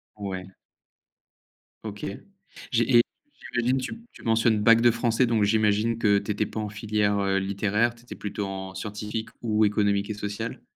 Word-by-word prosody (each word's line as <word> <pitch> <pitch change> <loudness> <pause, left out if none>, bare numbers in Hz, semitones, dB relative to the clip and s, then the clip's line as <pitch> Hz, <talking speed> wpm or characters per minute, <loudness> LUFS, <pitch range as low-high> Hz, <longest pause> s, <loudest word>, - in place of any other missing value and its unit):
Ouais. 95 -3 -5 1.4
OK 105 -2 -6 0.7
j'ai 120 +1 +4
et - - +9 0.5
j'imagine 125 +2 +2
tu 130 - -3 0.2
tu - - -15
mentionnes: 115 -1 +3
«Bac 115 +1 +6
de 120 - +6
français» 120 +1 +2
donc 115 -3 +2
j'imagine 110 +2 +2
que 105 -3 +3
tu 105 - -4
étais 105 +1 0
pas 110 - -6
en 105 -1 -3
filière, 105 -1 0
heu, 95 0 +1
littéraire, 105 +4 0
tu 120 - -19
étais - - -9
plutôt 105 0 -4
en 95 0 -6
scientifique 105 +3 -5
ou 110 -2 +2
économique 100 -1 +1
et 110 - -1
social? 105 +2 -5
105 Hz, 165 wpm, -26 LUFS, 100-115 Hz, 1.4 s, et